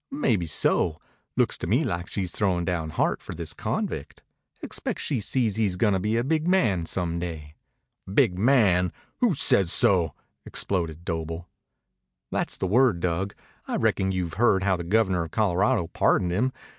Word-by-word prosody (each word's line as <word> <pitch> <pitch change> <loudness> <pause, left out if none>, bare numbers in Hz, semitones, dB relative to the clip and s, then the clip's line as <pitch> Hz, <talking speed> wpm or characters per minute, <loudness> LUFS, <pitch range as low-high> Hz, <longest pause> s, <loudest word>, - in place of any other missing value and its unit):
"Maybeso. 90 - 0 0.4
Looks - - +2
to - - -4
me 120 - +2
like 85 - -3
she's 95 -4 -3
throwin' 90 -4 0
down 85 -2 -2
Hart 80 - 0
for - - -8
this - - -5
convict. - - -4 0.4
Expect - - -3
she 130 -6 -2
sees 110 -1 0
he's 105 -5 +1
gonna 100 -1 +2
be 105 +4 0
a 120 - +1
big 155 +4 0
man 110 - +2
some 85 0 -2
day." 80 -4 -6 0.6
"Big 90 -2 +3
man! 95 -6 +3 0.3
Who 235 -9 +2
says 95 -8 +4
so?" 85 -8 +4 0.3
exploded 85 -3 -2
Doble. 80 0 -4 0.8
"That's - - -2
the - - -2
word, 115 -1 +3
Dug. 90 +3 -2 0.3
I - - -2
reckon 95 0 +1
you've 90 -3 -3
heard 95 -5 +4
how 95 -1 +2
the 85 - -5
Governor 95 -2 +1
of - - -9
Colorado 95 -3 +1
pardoned 90 +1 +1
him. 120 +9 +1
95 Hz, 160 wpm, -25 LUFS, 85-110 Hz, 0.8 s, says